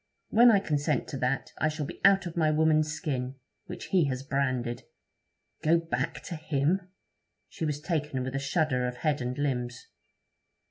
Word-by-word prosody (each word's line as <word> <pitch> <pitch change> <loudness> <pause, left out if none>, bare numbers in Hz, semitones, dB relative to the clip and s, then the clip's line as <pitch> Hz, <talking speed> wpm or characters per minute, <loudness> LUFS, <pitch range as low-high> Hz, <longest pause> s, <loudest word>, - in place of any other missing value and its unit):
When 240 +2 +7
I 220 - +6
consent 150 -6 0
to 135 - -4
that, 130 +1 -1
I - - +3
shall 155 -1 -2
be - - -9
out 195 -1 +6
of 170 - -6
my 160 -2 +3
woman's 155 0 +3
skin, 135 -5 -3 0.3
which - - -7
he 180 -5 +4
has 130 -1 -2
branded. 130 -3 -1 0.8
Go 160 +2 +4
back 165 -6 -3
to 170 - -5
him!' 160 +4 0 0.6
She 160 - -4
was 150 -1 -1
taken 150 -5 -2
with 130 +1 -4
a 135 - -1
shudder 135 -2 +1
of 125 0 -5
head 150 -1 0
and 125 +1 -3
limbs. 125 -4 -2
150 Hz, 175 wpm, -29 LUFS, 130-160 Hz, 0.8 s, When